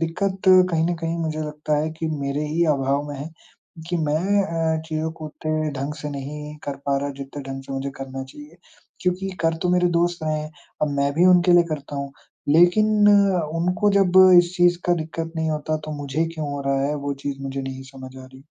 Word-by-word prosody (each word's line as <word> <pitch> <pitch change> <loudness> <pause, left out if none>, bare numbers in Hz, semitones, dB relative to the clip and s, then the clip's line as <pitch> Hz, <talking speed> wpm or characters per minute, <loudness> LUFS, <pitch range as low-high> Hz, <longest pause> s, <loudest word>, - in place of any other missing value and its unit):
दिक्कत 190 +4 -2 0.3
कहीं 160 -1 +1
न - - 0
कहीं 165 0 -2
मुझे 155 -1 -2
लगता 150 0 -2
है 155 - -2
कि 160 - -2
मेरे 140 +2 -2
ही 165 +3 +1
अभाव 135 +1 0
में 145 - -6
है, 150 +4 -6 0.6
कि 175 - 0
मैं 170 +6 +1 0.4
अ, - - -5
चीज़ों 160 0 -2
को 160 -1 -8
उतने 155 0 -2
ढंग 145 +2 -3
से 150 - -4
नहीं 150 +2 -7
कर 140 -1 -4
पा 140 0 +2
रहा, 140 0 -3
जितने 140 +1 -7
ढंग 135 0 -6
से 135 - -8
मुझे 135 +1 -3
करना 135 0 -5
चाहिए, 145 +5 -13 0.4
क्योंकि 185 +1 -1
कर 165 0 +2
तो 180 - 0
मेरे 180 0 +3
दोस्त 175 -1 0
रहे 155 0 0
हैं। 155 - -7 0.3
अब 150 - +2
मैं 140 0 +1
भी 175 +4 +4
उनके 180 -1 +5
लिए 175 0 +7
करता 145 -1 -5
हूँ, 140 0 -4 0.4
लेकिन 175 +7 +5 0.7
उनको 180 +5 +1
जब 195 -3 +3 0.3
इस 175 +1 +2
चीज़ 175 0 +4
का 175 - +4
दिक्कत 165 0 -5
नहीं 160 0 0
होता 155 0 -1
तो - - -5
मुझे 145 +4 -1
क्यों 155 -2 -4
हो 140 - -4
रहा 135 0 +1
है, 150 - -1
वो 140 -1 -3
चीज़ 140 -1 -4
मुझे 135 0 -4
नहीं 130 0 -6
समझ 130 0 -10
आ 130 - -10
रही। 130 +1 -16
155 Hz, 215 wpm, -23 LUFS, 140-170 Hz, 0.7 s, लिए